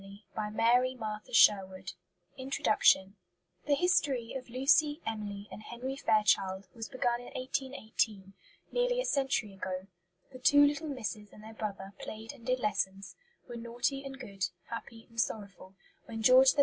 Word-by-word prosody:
STOKES 195 Hz, 0 st, -12 dB, 0.2 s
COMPANY 235 Hz, +4 st, +2 dB
PUBLISHERS 205 Hz, -4 st, +2 dB, 0.4 s
Introduction 215 Hz, -6 st, +3 dB, 0.5 s
The 290 Hz, -, +4 dB
History 280 Hz, -8 st, +1 dB
of 255 Hz, -2 st, -6 dB
Lucy, 290 Hz, +4 st, +3 dB
Emily, 205 Hz, -2 st, -4 dB
and -, -, -8 dB
Henry 245 Hz, +4 st, -5 dB
Fairchild 205 Hz, -5 st, +2 dB
was 225 Hz, -2 st, -7 dB
begun 240 Hz, -2 st, 0 dB
in 245 Hz, -, -10 dB
1818, 220 Hz, -7 st, -2 dB, 0.4 s
nearly -, -, +1 dB
a -, -, 0 dB
century 265 Hz, -, 0 dB
ago. 185 Hz, -1 st, -4 dB, 0.5 s
The 255 Hz, -, -10 dB
two 285 Hz, +3 st, +7 dB
little 295 Hz, +2 st, 0 dB
misses 225 Hz, -6 st, -4 dB
and 210 Hz, -, -14 dB
their 220 Hz, +1 st, -10 dB
brother 200 Hz, -2 st, -5 dB
played 220 Hz, +1 st, -7 dB
and 235 Hz, -, -16 dB
did 255 Hz, +1 st, 0 dB
lessons, 195 Hz, -3 st, -2 dB, 0.3 s
were 240 Hz, -1 st, -7 dB
naughty 240 Hz, +4 st, -2 dB
and 270 Hz, -1 st, -8 dB
good, 195 Hz, -6 st, -3 dB, 0.3 s
happy 230 Hz, 0 st, -7 dB
and 230 Hz, -1 st, 0 dB
sorrowful, 200 Hz, -4 st, -5 dB, 0.3 s
when 225 Hz, -1 st, -5 dB
George 260 Hz, +3 st, +7 dB
III. -, -, +1 dB
230 Hz, 150 wpm, -31 LUFS, 205-260 Hz, 0.5 s, two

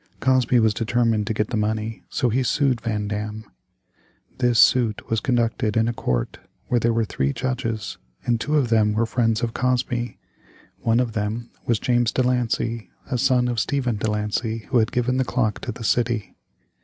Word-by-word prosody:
Cosby 130 Hz, -2 st, +3 dB
was 110 Hz, -2 st, +3 dB
determined 115 Hz, -1 st, +1 dB
to 110 Hz, -, 0 dB
get 105 Hz, 0 st, 0 dB
the 115 Hz, -, 0 dB
money, 110 Hz, +1 st, -2 dB
so 125 Hz, -, 0 dB
he 125 Hz, +4 st, +1 dB
sued 130 Hz, -1 st, +1 dB
Van 105 Hz, -3 st, -2 dB
Dam. 105 Hz, +1 st, -4 dB, 0.9 s
This 120 Hz, -2 st, +2 dB
suit 115 Hz, -3 st, +4 dB
was 115 Hz, -, +2 dB
conducted 115 Hz, -3 st, 0 dB
in 115 Hz, 0 st, +3 dB
a 120 Hz, -, 0 dB
court -, -, -2 dB, 0.3 s
where 120 Hz, -, +1 dB
there 115 Hz, 0 st, +2 dB
were 115 Hz, -1 st, +1 dB
three 70 Hz, -8 st, -1 dB
judges, 115 Hz, -5 st, -3 dB, 0.3 s
and 120 Hz, -2 st, +1 dB
two 150 Hz, +4 st, 0 dB
of 130 Hz, -5 st, +1 dB
them 110 Hz, -2 st, +3 dB
were 115 Hz, +2 st, +1 dB
friends 115 Hz, 0 st, 0 dB
of 115 Hz, -1 st, -1 dB
Cosby. 125 Hz, -1 st, -1 dB, 0.6 s
One 115 Hz, +1 st, +2 dB
of 120 Hz, -3 st, 0 dB
them 110 Hz, +2 st, -3 dB, 0.2 s
was 115 Hz, -, +3 dB
James 120 Hz, 0 st, +1 dB
De 130 Hz, -, +1 dB
Lancey, 115 Hz, -2 st, -1 dB, 0.2 s
a 125 Hz, -, +1 dB
son 125 Hz, -1 st, +3 dB
of 120 Hz, -1 st, -2 dB
that -, -, +3 dB
Stephen 125 Hz, -5 st, -1 dB
De 110 Hz, -, -1 dB
Lancey 105 Hz, +1 st, -2 dB
who 125 Hz, -, +4 dB
had 110 Hz, -, +1 dB
given 125 Hz, +1 st, 0 dB
the 130 Hz, -, +2 dB
clock 120 Hz, -4 st, -1 dB
to 125 Hz, -, -4 dB
the 115 Hz, +1 st, -9 dB
city. 120 Hz, -1 st, 0 dB
115 Hz, 195 wpm, -23 LUFS, 110-125 Hz, 0.9 s, suit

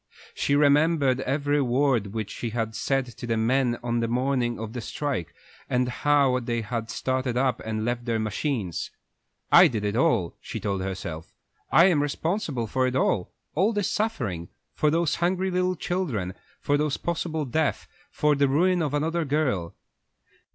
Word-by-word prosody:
She 140 Hz, -, +1 dB
remembered 145 Hz, -2 st, +3 dB
every 145 Hz, +2 st, 0 dB
word 125 Hz, -4 st, +2 dB
which 110 Hz, 0 st, -4 dB
she 120 Hz, -, -4 dB
had 110 Hz, -1 st, -2 dB
said 135 Hz, +4 st, 0 dB
to 120 Hz, -, -6 dB
the 115 Hz, -1 st, 0 dB
men 120 Hz, +2 st, +2 dB
on 120 Hz, 0 st, 0 dB
the 115 Hz, -, 0 dB
morning 125 Hz, 0 st, 0 dB
of 110 Hz, 0 st, -6 dB
the 125 Hz, -, -4 dB
strike, 120 Hz, -, -3 dB, 0.4 s
and 125 Hz, 0 st, +1 dB
how 135 Hz, 0 st, +2 dB
they 120 Hz, -1 st, -2 dB
had 115 Hz, +1 st, -4 dB
started 130 Hz, 0 st, -1 dB
up 130 Hz, 0 st, +1 dB
and 110 Hz, 0 st, -3 dB
left 120 Hz, 0 st, -2 dB
their 115 Hz, -2 st, 0 dB
machines. 110 Hz, -, -2 dB, 0.6 s
"I -, -, +9 dB
did 110 Hz, -4 st, -3 dB
it 105 Hz, +1 st, -1 dB
all," 110 Hz, -8 st, +2 dB
she -, -, -6 dB
told 100 Hz, -2 st, -2 dB
herself. 90 Hz, -4 st, -5 dB, 0.4 s
"I 170 Hz, -, +7 dB
am 170 Hz, -6 st, +4 dB
responsible 145 Hz, -, -1 dB
for 130 Hz, +4 st, 0 dB
it 125 Hz, -, -2 dB
all 100 Hz, -8 st, +1 dB, 0.2 s
all 195 Hz, +8 st, +2 dB
this 205 Hz, -3 st, 0 dB
suffering, 115 Hz, -, -2 dB, 0.2 s
for 150 Hz, -, +2 dB
those 165 Hz, 0 st, +1 dB
hungry 185 Hz, +2 st, +1 dB
little 180 Hz, 0 st, +1 dB
children, 140 Hz, -, -2 dB, 0.3 s
for 145 Hz, -, +1 dB
that 150 Hz, -1 st, -1 dB
possible 160 Hz, -2 st, -2 dB
death, 150 Hz, +4 st, -1 dB, 0.2 s
for 150 Hz, 0 st, +2 dB
the 140 Hz, 0 st, +3 dB
ruin 175 Hz, +6 st, +2 dB
of 150 Hz, -2 st, -1 dB
another 165 Hz, +3 st, 0 dB
girl." 130 Hz, -, -1 dB
130 Hz, 170 wpm, -26 LUFS, 115-150 Hz, 0.6 s, I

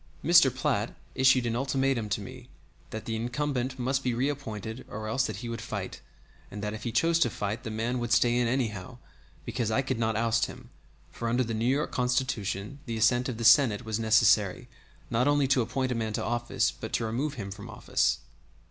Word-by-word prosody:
Mr. 170 Hz, -5 st, +7 dB
Platt 125 Hz, -4 st, -1 dB, 0.2 s
issued 130 Hz, -2 st, +4 dB
an 115 Hz, -1 st, -1 dB
ultimatum 135 Hz, -3 st, 0 dB
to 105 Hz, -, -1 dB
me 125 Hz, +3 st, -10 dB, 0.4 s
that 110 Hz, 0 st, -6 dB
the 115 Hz, -2 st, -2 dB
incumbent 125 Hz, +2 st, -2 dB
must 135 Hz, +2 st, 0 dB
be 125 Hz, -2 st, 0 dB
reappointed 120 Hz, -4 st, -3 dB
or 110 Hz, 0 st, -5 dB
else 125 Hz, +4 st, +1 dB
that -, -, -4 dB
he 120 Hz, -, -6 dB
would 115 Hz, -1 st, -4 dB
fight, -, -, -5 dB, 0.5 s
and 105 Hz, +1 st, -7 dB
that 105 Hz, 0 st, -2 dB
if 110 Hz, -, -7 dB
he 120 Hz, -, -1 dB
chose 165 Hz, +8 st, +2 dB
to 120 Hz, -, +3 dB
fight 105 Hz, +1 st, -3 dB
the -, -, -4 dB
man 115 Hz, +3 st, -2 dB
would 120 Hz, -1 st, -3 dB
stay 120 Hz, +1 st, +4 dB
in 120 Hz, -1 st, +2 dB
anyhow 120 Hz, -2 st, -2 dB, 0.5 s
because 120 Hz, -1 st, -2 dB
I 130 Hz, +5 st, +1 dB
could 130 Hz, -3 st, -2 dB
not 110 Hz, -1 st, 0 dB
oust 115 Hz, +1 st, +2 dB
him -, -, -12 dB, 0.4 s
for 115 Hz, -, -3 dB
under 125 Hz, +2 st, +2 dB
the 115 Hz, -1 st, -3 dB
New 110 Hz, +1 st, -1 dB
York 140 Hz, +4 st, +1 dB
Constitution 125 Hz, -2 st, -1 dB
the 115 Hz, -1 st, -3 dB
assent 120 Hz, +3 st, +3 dB
of 120 Hz, -, -4 dB
the 115 Hz, -, -4 dB
Senate 120 Hz, -4 st, +5 dB
was 110 Hz, 0 st, -2 dB
necessary 110 Hz, -3 st, +3 dB, 0.4 s
not 125 Hz, +4 st, +2 dB
only 145 Hz, -1 st, +3 dB
to 135 Hz, -2 st, +4 dB
appoint 130 Hz, +2 st, -1 dB
a -, -, +2 dB
man 110 Hz, -2 st, -2 dB
to -, -, -2 dB
office 120 Hz, +1 st, 0 dB
but -, -, -8 dB
to 115 Hz, -, 0 dB
remove 135 Hz, +7 st, -2 dB
him 100 Hz, -5 st, -6 dB
from 100 Hz, +1 st, -9 dB
office. -, -, 0 dB
120 Hz, 210 wpm, -28 LUFS, 110-130 Hz, 0.5 s, Mr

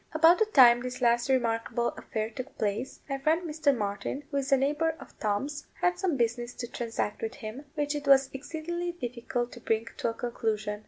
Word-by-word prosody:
About 325 Hz, +3 st, +6 dB
the 440 Hz, -, +3 dB
time 245 Hz, -, +7 dB
this 250 Hz, 0 st, -5 dB
last 240 Hz, +1 st, +2 dB
remarkable 235 Hz, -1 st, +1 dB
affair 220 Hz, 0 st, -4 dB
took 255 Hz, +4 st, -8 dB
place, 215 Hz, +5 st, -2 dB
my 275 Hz, -1 st, -2 dB
friend 320 Hz, +5 st, +1 dB
Mr. 305 Hz, -2 st, +2 dB
Martin, 205 Hz, +7 st, -3 dB
who 280 Hz, -, -1 dB
is 275 Hz, 0 st, -2 dB
a 275 Hz, -, +7 dB
neighbour 300 Hz, +4 st, +1 dB
of -, -, -13 dB
Tom's, 245 Hz, +8 st, -2 dB
had 355 Hz, 0 st, +1 dB
some 355 Hz, -7 st, 0 dB
business 240 Hz, 0 st, -1 dB
to 240 Hz, -, -5 dB
transact 230 Hz, -3 st, -3 dB
with 225 Hz, +1 st, -3 dB
him, 250 Hz, +2 st, -7 dB
which 290 Hz, -1 st, 0 dB
it 290 Hz, -1 st, -4 dB
was 270 Hz, -1 st, +6 dB
exceedingly 345 Hz, +5 st, -4 dB
difficult 245 Hz, -4 st, -3 dB
to 240 Hz, -, -10 dB
bring 225 Hz, -1 st, 0 dB
to -, -, 0 dB
a -, -, -3 dB
conclusion. 215 Hz, -3 st, -2 dB
255 Hz, 200 wpm, -29 LUFS, 230-295 Hz, -, time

